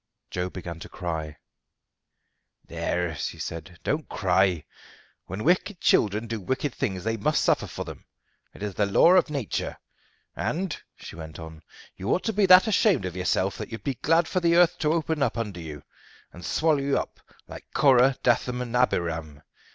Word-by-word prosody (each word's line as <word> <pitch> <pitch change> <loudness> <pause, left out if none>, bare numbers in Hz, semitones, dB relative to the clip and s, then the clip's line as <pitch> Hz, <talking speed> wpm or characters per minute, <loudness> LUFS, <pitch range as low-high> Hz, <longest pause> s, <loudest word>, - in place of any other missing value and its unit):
Joe 90 0 -2
began 85 -3 -7
to - - -9
cry. 80 -4 -5 1.3
"There," 90 -2 -2
she - - -4
said, 85 +2 -7
"don't 150 +1 -2
cry. 95 -4 +1 0.6
When 95 +4 -5
wicked 180 +3 +1
children 105 +1 +2
do 115 -2 -4
wicked 130 +7 -2
things 95 -3 -3
they 115 +1 -1
must 150 +9 +1
suffer - - +2
for - - -6
them. - - -10 0.5
It - - -10
is 105 -2 -3
the 100 +2 +1
law 130 - +5
of 180 -3 +5
nature. 140 -8 -3 0.6
And," 180 0 -2 0.2
she - - -10
went 80 -1 -9
on, 80 -1 -10 0.4
"you 95 +4 -4
ought 185 - +1
to 225 - -1
be 200 -1 +3
that 185 0 +8
ashamed 200 - +3
of 90 -2 -5
yourself 95 +1 0
that - - -6
you'd 115 - -7
be 140 - -1
glad 165 +6 +2
for 185 - 0
the 170 -1 +3
earth 175 -1 +4
to 150 - +1
open 160 -2 -1
under 115 -7 -1
you 75 -3 -8 0.5
and 85 - -11
swallow 155 - +2
you 140 0 +1
up - - -4 0.3
like - - -10
Korah, 130 -1 +5
Dathan, 125 0 +2
and 125 -1 -4
Abiram. 85 - 0
115 Hz, 175 wpm, -26 LUFS, -, 1.3 s, that